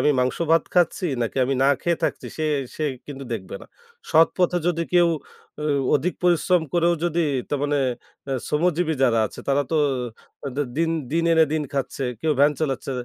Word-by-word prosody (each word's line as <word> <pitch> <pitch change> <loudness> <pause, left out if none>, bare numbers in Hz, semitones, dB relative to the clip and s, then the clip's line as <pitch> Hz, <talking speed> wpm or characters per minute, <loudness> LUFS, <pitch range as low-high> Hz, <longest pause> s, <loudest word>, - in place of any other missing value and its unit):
আমি 150 - +4
মাংস-ভাত 165 +6 +2
খাচ্ছি, 180 +1 +2 0.2
নাকি 115 - -3
আমি 135 - 0
না 135 - +4 0.2
খেয়ে 170 -1 +1
থাকছি, - - -2
সে 155 - -2 0.3
সেই 155 -2 0 0.2
কিন্তু 140 -2 -7
দেখবে 95 -5 -5
না। - - -12 0.4
সৎপথে 175 +2 +3
যদি 170 -1 +1
কেউ 175 -1 +5 0.5
অ - - -3 0.3
অধিক 155 +6 0
পরিশ্রম 180 0 +3
করেও 175 0 +3
যদি 170 0 0 0.3
তার 145 - -1
মানে 145 0 +1 0.5
অ্যা 135 - -2
শ্রমজীবী 165 +1 +1
যারা 120 -3 +4
আছে, - - -10
তারা 140 +1 +3
তো 160 - +1 0.7
তাদের 140 +1 -3
দিন 165 0 +1 0.2
দিন 165 +1 +1
এনে 160 -1 +6
দিন 155 -1 0
খাচ্ছে। 135 0 -2 0.2
কেউ 160 - +1
ভ্যান 145 +1 +5
চালাচ্ছে। 135 -3 -2
155 Hz, 175 wpm, -23 LUFS, 140-170 Hz, 0.7 s, এনে